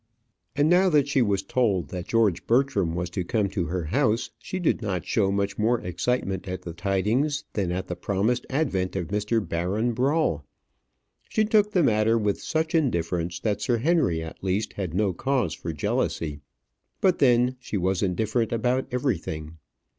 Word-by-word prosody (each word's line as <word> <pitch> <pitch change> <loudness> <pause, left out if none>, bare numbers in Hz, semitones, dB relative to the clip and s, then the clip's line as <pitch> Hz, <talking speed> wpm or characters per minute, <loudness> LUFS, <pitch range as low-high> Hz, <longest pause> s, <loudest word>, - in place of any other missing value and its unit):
And 145 +2 +3
now 180 +3 +5
that 145 -4 +3
she 140 -2 +2
was 100 -4 +1
told 100 -4 0
that 90 -1 -6
George 110 -7 +1
Bertram 115 -9 +2
was 90 0 -2
to 90 - -2
come 105 +2 0
to 90 -2 -2
her 85 +2 -2
house, 115 - 0
she 185 - -5
did 175 -9 +1
not 95 -6 -2
show 100 -3 +1
much 100 +1 -1
more 115 +2 +2
excitement 95 0 -2
at 90 0 -5
the 85 - -6
tidings 105 - 0
than 95 -4 -1
at 95 +1 -2
the - - -4
promised 110 +5 -1
advent 115 -12 -1
of 90 -4 -3
Mr. 105 0 0
Baron 95 +9 -1
Brawl. 130 - +1 0.9
She 215 - +2
took 210 -1 +3
the 180 - +4
matter 110 -2 +3
with 105 -2 0
such 160 0 -1
indifference 85 - 0
that 105 -2 -1
Sir 120 +2 +1
Henry, 115 - +1
at 80 - -10
least, 100 +3 -1
had 90 -5 -4
no 100 -1 +1
cause 130 +7 0
for 85 - -5
jealousy. 75 0 -2 0.6
But 185 -2 +2
then 125 -1 +4
she 115 -4 -4
was 95 0 0
indifferent 110 +5 0
about 125 +3 0
everything. 85 - -2
105 Hz, 175 wpm, -25 LUFS, 90-130 Hz, 0.9 s, now